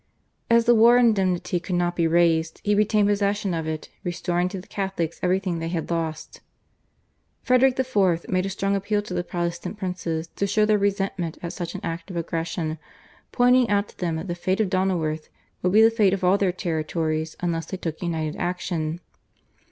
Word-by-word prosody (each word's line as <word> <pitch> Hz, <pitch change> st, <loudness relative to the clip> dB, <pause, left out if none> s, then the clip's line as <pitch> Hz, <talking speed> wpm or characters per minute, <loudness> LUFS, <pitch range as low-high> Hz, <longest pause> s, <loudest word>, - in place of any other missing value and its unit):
As 235 Hz, 0 st, +5 dB
the 240 Hz, -, +6 dB
war 235 Hz, +2 st, +6 dB
indemnity 190 Hz, -7 st, +2 dB
could 180 Hz, +1 st, -3 dB
not 175 Hz, 0 st, 0 dB
be 170 Hz, -1 st, +2 dB
raised 165 Hz, -1 st, +2 dB
he 210 Hz, -, +2 dB
retained 210 Hz, 0 st, +3 dB
possession 205 Hz, -1 st, 0 dB
of 160 Hz, -1 st, -2 dB
it, 155 Hz, -1 st, -4 dB
restoring 175 Hz, 0 st, -1 dB
to 190 Hz, -, -5 dB
the 180 Hz, -, -12 dB
Catholics 190 Hz, -5 st, -3 dB
everything 185 Hz, -1 st, 0 dB
they 165 Hz, -, -3 dB
had 165 Hz, 0 st, -3 dB
lost. 160 Hz, -2 st, -4 dB, 1.0 s
Frederick 255 Hz, 0 st, +4 dB
IV. 195 Hz, -10 st, +1 dB
made 185 Hz, +1 st, 0 dB
a -, -, -3 dB
strong 195 Hz, +1 st, -1 dB
appeal 205 Hz, +1 st, 0 dB
to 205 Hz, -, -7 dB
the 175 Hz, 0 st, -1 dB
Protestant 175 Hz, +2 st, -4 dB
princes 180 Hz, -4 st, -3 dB
to 200 Hz, -, 0 dB
show 215 Hz, +2 st, +3 dB
their 210 Hz, -1 st, +3 dB
resentment 195 Hz, -4 st, -1 dB
at 170 Hz, -, -4 dB
such 175 Hz, -3 st, -5 dB
an -, -, -5 dB
act 165 Hz, +2 st, -5 dB
of 180 Hz, -, -5 dB
aggression, 165 Hz, -1 st, -3 dB, 0.5 s
pointing 250 Hz, -1 st, +4 dB
out 205 Hz, 0 st, +1 dB
to -, -, -19 dB
them 170 Hz, -3 st, -1 dB
that 160 Hz, +4 st, -5 dB
the 175 Hz, -, -2 dB
fate 185 Hz, +3 st, -1 dB
of 205 Hz, -4 st, +1 dB
Donauworth 170 Hz, -5 st, 0 dB, 0.3 s
would 180 Hz, -, +1 dB
be 215 Hz, +3 st, +6 dB
the 225 Hz, -, +6 dB
fate 210 Hz, -4 st, +3 dB
of 190 Hz, -, -8 dB
all 180 Hz, +2 st, +5 dB
their 195 Hz, -2 st, +2 dB
territories 160 Hz, -2 st, -2 dB
unless 165 Hz, -2 st, -2 dB
they 190 Hz, -, -5 dB
took 165 Hz, -3 st, -5 dB
united 160 Hz, -3 st, -2 dB
action. 175 Hz, -2 st, -2 dB
180 Hz, 190 wpm, -24 LUFS, 165-200 Hz, 1.0 s, the